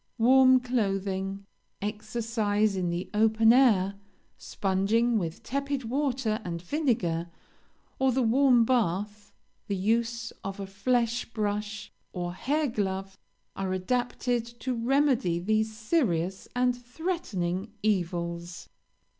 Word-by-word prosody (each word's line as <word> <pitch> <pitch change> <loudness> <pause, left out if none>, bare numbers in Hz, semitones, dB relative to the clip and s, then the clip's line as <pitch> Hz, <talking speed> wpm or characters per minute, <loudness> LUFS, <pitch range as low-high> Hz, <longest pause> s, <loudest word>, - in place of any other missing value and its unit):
Warm 260 +2 +6
clothing, 195 -5 -2 0.3
exercise 215 -1 -1
in 180 -2 -1
the 175 +2 -3
open 220 +1 +5
air, 200 -7 +4 0.4
sponging 215 +5 +1
with 165 -3 -5
tepid 280 0 -2
water 250 -3 -1
and 170 -3 -4
vinegar, 175 - -1 0.7
or 265 0 +3
the 260 +1 +1
warm 245 0 +4
bath, 210 -3 -1 0.4
the 200 - -1
use 230 +3 0
of 195 +1 -5
a 195 - -4
flesh 235 +4 0
brush 210 -1 -3 0.2
or 175 -1 -3
hair 295 - 0
glove, 195 -5 -3 0.4
are 190 -1 -2
adapted 245 +4 -1
to 235 +2 -5
remedy 245 - +2
these 215 +4 0
serious 195 - 0
and 250 0 +2
threatening 240 - -3
evils. 175 -3 -2
215 Hz, 110 wpm, -28 LUFS, 190-245 Hz, 0.7 s, Warm